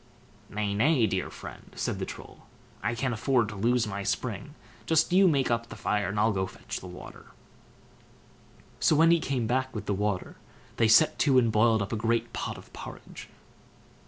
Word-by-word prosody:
"Nay, 105 Hz, -1 st, -2 dB
nay, 125 Hz, +3 st, +3 dB
dear 95 Hz, -3 st, -1 dB
friend!" -, -, -11 dB
said -, -, -2 dB
the -, -, -3 dB
Troll; -, -, -11 dB, 0.3 s
"I 115 Hz, -, -1 dB
can't 130 Hz, +1 st, -1 dB
afford 120 Hz, -1 st, +1 dB
to 105 Hz, -, -7 dB
lose 115 Hz, +4 st, +2 dB
my 100 Hz, -2 st, -4 dB
spring; 120 Hz, +7 st, -3 dB, 0.3 s
just 160 Hz, +1 st, +3 dB
you 190 Hz, +1 st, +6 dB
make 140 Hz, -7 st, +2 dB
up 115 Hz, 0 st, -1 dB
the -, -, -8 dB
fire, 105 Hz, -2 st, -1 dB
and 105 Hz, +2 st, -2 dB
I'll 110 Hz, +2 st, +3 dB
go 95 Hz, -2 st, -1 dB
and 95 Hz, -, -2 dB
fetch -, -, -7 dB
the 90 Hz, -, -10 dB
water." 90 Hz, 0 st, -11 dB, 1.5 s
So 155 Hz, -, +3 dB
when 165 Hz, +2 st, +5 dB
he 170 Hz, -, +5 dB
came 135 Hz, -6 st, -1 dB
back 130 Hz, +2 st, -1 dB
with 105 Hz, -, -4 dB
the 105 Hz, -, 0 dB
water, 100 Hz, -1 st, -2 dB, 0.4 s
they 115 Hz, -, +4 dB
set 115 Hz, +8 st, +5 dB
to 135 Hz, -3 st, +4 dB
and 115 Hz, -3 st, +4 dB
boiled 110 Hz, 0 st, +3 dB
up 100 Hz, -, -5 dB
a -, -, -1 dB
great 115 Hz, +1 st, 0 dB
pot -, -, -4 dB
of -, -, -15 dB
porridge. -, -, -10 dB
115 Hz, 195 wpm, -28 LUFS, 105-130 Hz, 1.5 s, you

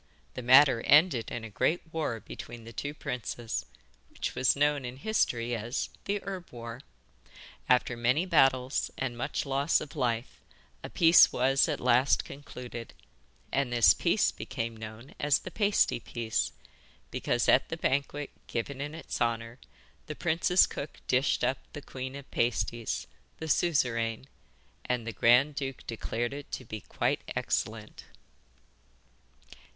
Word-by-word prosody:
The -, -, -5 dB
matter 130 Hz, 0 st, +6 dB
ended 145 Hz, -5 st, +5 dB
in 120 Hz, -, -5 dB
a 110 Hz, -, -8 dB
great 160 Hz, -, -1 dB
war 150 Hz, -8 st, -2 dB
between 115 Hz, +1 st, -9 dB
the 115 Hz, +1 st, -11 dB
two 145 Hz, +6 st, -4 dB
princes, 120 Hz, -, -4 dB, 0.4 s
which -, -, -4 dB
was 130 Hz, -, +3 dB
known 145 Hz, 0 st, +2 dB
in 125 Hz, +1 st, -6 dB
history 120 Hz, -, 0 dB
as 115 Hz, +4 st, -3 dB, 0.2 s
the 205 Hz, +1 st, 0 dB
'Herb 190 Hz, -3 st, -6 dB
War.' 115 Hz, 0 st, -8 dB, 0.9 s
After 125 Hz, -1 st, +3 dB
many 125 Hz, +8 st, +2 dB
battles 135 Hz, -6 st, +3 dB
and 130 Hz, -3 st, -2 dB
much 120 Hz, -, -2 dB
loss 140 Hz, +3 st, +2 dB
of 150 Hz, +1 st, -9 dB
life, 120 Hz, -4 st, -2 dB, 0.4 s
a -, -, -6 dB
peace 165 Hz, 0 st, +7 dB
was 135 Hz, +2 st, +3 dB
at 150 Hz, -, -1 dB
last 125 Hz, +2 st, +3 dB
concluded, 125 Hz, -, -9 dB, 0.6 s
and 135 Hz, -2 st, 0 dB
this 120 Hz, -3 st, +6 dB
peace -, -, +2 dB
became 115 Hz, 0 st, -5 dB
known 110 Hz, +3 st, -10 dB
as 145 Hz, -1 st, +3 dB
the -, -, -9 dB
'Pasty 205 Hz, -, +2 dB
Peace,' 115 Hz, -2 st, -2 dB, 0.6 s
because -, -, 0 dB
at -, -, +4 dB
the -, -, -4 dB
banquet 140 Hz, +1 st, -1 dB, 0.2 s
given 130 Hz, +4 st, -4 dB
in 145 Hz, +2 st, -5 dB
its 165 Hz, -, -6 dB
honour 115 Hz, +1 st, -1 dB, 0.5 s
the 150 Hz, -, -5 dB
prince's 170 Hz, +3 st, +3 dB
cook 145 Hz, +1 st, -7 dB
dished 130 Hz, +3 st, +1 dB
up 130 Hz, -, +1 dB
the -, -, -6 dB
Queen 130 Hz, 0 st, -6 dB
of 140 Hz, -1 st, -10 dB
Pasties 120 Hz, -1 st, -1 dB, 0.3 s
the 160 Hz, -, -6 dB
Suzeraine 120 Hz, -8 st, +1 dB, 0.6 s
and 125 Hz, -2 st, -2 dB
the 115 Hz, -, -4 dB
grand 125 Hz, +6 st, +4 dB
duke 135 Hz, -2 st, -5 dB
declared 120 Hz, +2 st, -3 dB
it 145 Hz, 0 st, -8 dB
to 130 Hz, -, -5 dB
be 110 Hz, -1 st, -7 dB
quite -, -, -1 dB
excellent. -, -, -3 dB
130 Hz, 145 wpm, -29 LUFS, 115-145 Hz, 0.9 s, peace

